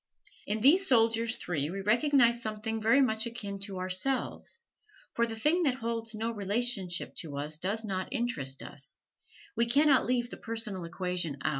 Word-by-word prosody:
In 210 Hz, +1 st, -1 dB
these 350 Hz, -, +6 dB
soldiers 230 Hz, -1 st, +3 dB
three 150 Hz, -4 st, -2 dB
we 195 Hz, +3 st, -4 dB
recognize 235 Hz, +2 st, +3 dB
something 220 Hz, 0 st, -3 dB
very 230 Hz, +6 st, +4 dB
much 220 Hz, -3 st, +1 dB
akin 205 Hz, -4 st, -6 dB
to 195 Hz, -2 st, -7 dB
ourselves, 220 Hz, -, -2 dB, 0.5 s
for 235 Hz, 0 st, +1 dB
the 225 Hz, -, -5 dB
thing 300 Hz, +10 st, +2 dB
that 275 Hz, -7 st, +2 dB
holds 230 Hz, -2 st, -4 dB
no 225 Hz, +2 st, -2 dB
relationship 205 Hz, -3 st, 0 dB
to 145 Hz, -4 st, -5 dB
us 150 Hz, +2 st, -2 dB
does 200 Hz, +6 st, -2 dB
not 190 Hz, -3 st, -3 dB
interest 195 Hz, -, -1 dB
us 140 Hz, +2 st, -10 dB, 0.6 s
we 235 Hz, +1 st, +2 dB
can 285 Hz, +6 st, +4 dB
not 270 Hz, -3 st, +4 dB
leave 245 Hz, -1 st, 0 dB
the -, -, -7 dB
personal 220 Hz, -6 st, -4 dB
equation 175 Hz, -3 st, -3 dB
out. -, -, +2 dB
225 Hz, 170 wpm, -30 LUFS, 185-240 Hz, 0.6 s, these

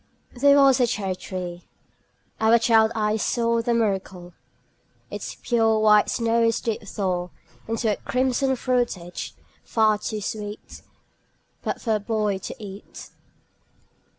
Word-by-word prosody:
There 280 Hz, +3 st, +5 dB
was 275 Hz, -2 st, +5 dB
a 245 Hz, -, +4 dB
cherry 195 Hz, -4 st, -2 dB
tree 180 Hz, -2 st, -6 dB, 0.8 s
our 225 Hz, +1 st, +5 dB
child 225 Hz, -1 st, +4 dB
eyes 215 Hz, 0 st, 0 dB
saw 235 Hz, -1 st, +1 dB
The 235 Hz, +1 st, 0 dB
miracle: 190 Hz, -5 st, -2 dB, 0.8 s
Its -, -, -6 dB
pure 225 Hz, -2 st, +1 dB
white 210 Hz, -1 st, +5 dB
snows 230 Hz, -1 st, +1 dB
did 225 Hz, -2 st, -3 dB
thaw 180 Hz, -3 st, -2 dB, 0.4 s
Into 225 Hz, 0 st, 0 dB
a -, -, -5 dB
crimson 260 Hz, +1 st, 0 dB
fruitage, 240 Hz, -9 st, -2 dB, 0.3 s
far 215 Hz, -2 st, +2 dB
too 215 Hz, 0 st, -4 dB
sweet 210 Hz, 0 st, -6 dB, 0.8 s
But -, -, -3 dB
for 225 Hz, -, -1 dB
a -, -, -7 dB
boy 210 Hz, -2 st, -1 dB
to -, -, -7 dB
eat. 205 Hz, -3 st, -10 dB
220 Hz, 125 wpm, -24 LUFS, 200-235 Hz, 0.8 s, There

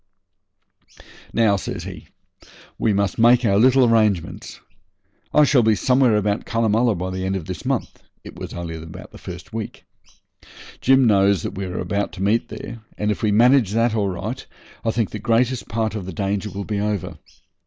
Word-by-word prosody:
'Now,' 110 Hz, -3 st, +3 dB
says -, -, -5 dB
he, -, -, -9 dB, 0.7 s
'we 110 Hz, -, +2 dB
must 100 Hz, -1 st, 0 dB
make 120 Hz, +2 st, +5 dB
our 100 Hz, -2 st, +3 dB
little 130 Hz, +2 st, +5 dB
arrangements. 110 Hz, -7 st, 0 dB, 0.7 s
I 150 Hz, -, +5 dB
shall 140 Hz, -3 st, +4 dB
be 110 Hz, -1 st, +3 dB
somewhere 125 Hz, -1 st, +3 dB
about 105 Hz, 0 st, 0 dB
Cunnamulla 115 Hz, 0 st, +1 dB
by 90 Hz, +1 st, -4 dB
the 95 Hz, 0 st, -4 dB
end 95 Hz, +1 st, -1 dB
of 90 Hz, -4 st, -4 dB
this 90 Hz, -4 st, -7 dB
month' -, -, -2 dB, 0.2 s
(it -, -, -11 dB
was -, -, -7 dB
only 85 Hz, -1 st, -5 dB
the 80 Hz, +1 st, -11 dB
first 90 Hz, +5 st, -9 dB
week). 110 Hz, -1 st, -6 dB, 1.0 s
'Jim 135 Hz, 0 st, +5 dB
knows 100 Hz, -4 st, +3 dB
that -, -, -4 dB
we 100 Hz, -1 st, -4 dB
are 90 Hz, -1 st, -4 dB, 0.2 s
to 95 Hz, -, -7 dB
meet 110 Hz, +4 st, +1 dB
there, 115 Hz, +2 st, -8 dB, 0.2 s
and 105 Hz, 0 st, 0 dB
if 105 Hz, -, -4 dB
we 105 Hz, -, +2 dB
manage 115 Hz, -1 st, +4 dB
that 115 Hz, 0 st, +2 dB
all 105 Hz, -3 st, 0 dB
right 105 Hz, +8 st, -5 dB, 0.4 s
I 115 Hz, -, 0 dB
think 115 Hz, -1 st, -1 dB
the 105 Hz, -, -5 dB
greatest 120 Hz, +3 st, +1 dB
part 110 Hz, 0 st, -1 dB
of 100 Hz, -4 st, -5 dB
the 95 Hz, -, -6 dB
danger 100 Hz, +3 st, -2 dB
will 100 Hz, 0 st, -6 dB
be 105 Hz, -2 st, -2 dB
over. 105 Hz, -3 st, -3 dB
105 Hz, 180 wpm, -21 LUFS, 95-115 Hz, 1.0 s, make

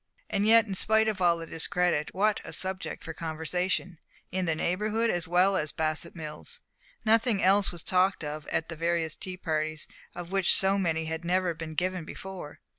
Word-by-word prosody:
And 200 Hz, +1 st, +1 dB
yet, 230 Hz, 0 st, +7 dB
in 200 Hz, -, -4 dB
spite 220 Hz, +3 st, +3 dB
of 210 Hz, -4 st, -1 dB
all 170 Hz, -2 st, +3 dB
discredit, 165 Hz, -1 st, +1 dB
what 210 Hz, +2 st, +2 dB
a -, -, -8 dB
subject 190 Hz, 0 st, -3 dB
for 160 Hz, -, -6 dB
conversation 170 Hz, +2 st, -2 dB, 0.3 s
in 185 Hz, 0 st, -1 dB
the 165 Hz, -2 st, +1 dB
Neighborhood 210 Hz, +7 st, 0 dB
as 175 Hz, 0 st, -1 dB
well 180 Hz, +3 st, +4 dB
as 150 Hz, -4 st, -1 dB
Bassett 155 Hz, +1 st, -2 dB
Mills! 165 Hz, -, -6 dB, 0.4 s
Nothing 220 Hz, -1 st, +3 dB
else 195 Hz, +2 st, +4 dB
was 175 Hz, -2 st, -6 dB
talked 185 Hz, -1 st, +2 dB
of 150 Hz, 0 st, -5 dB
at 165 Hz, -, -1 dB
the 165 Hz, -, -6 dB
various 165 Hz, -1 st, -1 dB
tea 185 Hz, -1 st, -6 dB
parties, 155 Hz, -2 st, -2 dB, 0.3 s
of 175 Hz, 0 st, -7 dB
which 195 Hz, -2 st, +4 dB
so 195 Hz, +1 st, +3 dB
many 160 Hz, -3 st, 0 dB
had 160 Hz, +1 st, -4 dB
never 180 Hz, 0 st, +1 dB
been 160 Hz, -1 st, -7 dB
given 180 Hz, +1 st, -1 dB
before. 180 Hz, -2 st, -8 dB
180 Hz, 185 wpm, -28 LUFS, 160-195 Hz, 0.4 s, yet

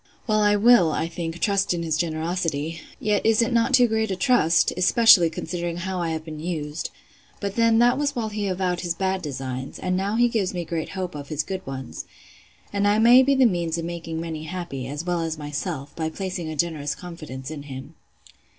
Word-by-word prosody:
Well, 215 Hz, -2 st, +2 dB
I 205 Hz, 0 st, +4 dB
will, 205 Hz, -6 st, +5 dB
I 160 Hz, -, -1 dB
think, 165 Hz, 0 st, -5 dB
trust 200 Hz, -3 st, +1 dB
in 170 Hz, -, -3 dB
his 160 Hz, -2 st, 0 dB
generosity! 165 Hz, -1 st, -2 dB, 0.2 s
Yet 210 Hz, -1 st, +1 dB
is 225 Hz, -1 st, +3 dB
it 230 Hz, -, -1 dB
not 230 Hz, +2 st, +2 dB
too 250 Hz, -2 st, +6 dB
great 220 Hz, -1 st, 0 dB
a 190 Hz, -, -1 dB
trust?—especially 180 Hz, -1 st, +5 dB
considering 170 Hz, +1 st, -4 dB
how 185 Hz, 0 st, -3 dB
I 170 Hz, -, -1 dB
have 160 Hz, -1 st, -4 dB
been 155 Hz, -2 st, -7 dB
used!—But 165 Hz, +5 st, -6 dB
then 230 Hz, -1 st, +4 dB
that 245 Hz, +3 st, +4 dB
was 290 Hz, -1 st, 0 dB
while 225 Hz, -3 st, -2 dB
he 210 Hz, -1 st, -3 dB
avowed 185 Hz, -1 st, -1 dB
his 175 Hz, -1 st, -2 dB
bad 190 Hz, +1 st, -1 dB
designs; 130 Hz, -3 st, -5 dB
and 185 Hz, 0 st, -1 dB
now 195 Hz, +3 st, -1 dB
he 240 Hz, +1 st, +4 dB
gives 215 Hz, -6 st, -1 dB
great 160 Hz, -1 st, -3 dB
hope 185 Hz, -1 st, -3 dB
of 145 Hz, -1 st, -8 dB
his 155 Hz, -1 st, -1 dB
good 190 Hz, +2 st, -5 dB
ones. 130 Hz, -2 st, -6 dB, 0.7 s
And 200 Hz, 0 st, +1 dB
I 205 Hz, +1 st, +3 dB
may 240 Hz, +3 st, +7 dB
be 275 Hz, +1 st, +3 dB
the 265 Hz, -1 st, +5 dB
means 170 Hz, -6 st, 0 dB
of 165 Hz, -, -3 dB
making 165 Hz, -1 st, -5 dB
many 160 Hz, -2 st, -5 dB
happy, 160 Hz, -7 st, -5 dB
as 145 Hz, +4 st, -5 dB
well 175 Hz, -1 st, 0 dB
as 160 Hz, -1 st, -3 dB
myself, 145 Hz, 0 st, -5 dB
by 160 Hz, -1 st, -2 dB
placing 180 Hz, -1 st, -4 dB
a 155 Hz, -, -5 dB
generous 150 Hz, -2 st, -1 dB
confidence 155 Hz, -6 st, -8 dB
in 155 Hz, -2 st, -6 dB
him. 140 Hz, +1 st, -9 dB
175 Hz, 205 wpm, -24 LUFS, 160-205 Hz, 0.7 s, may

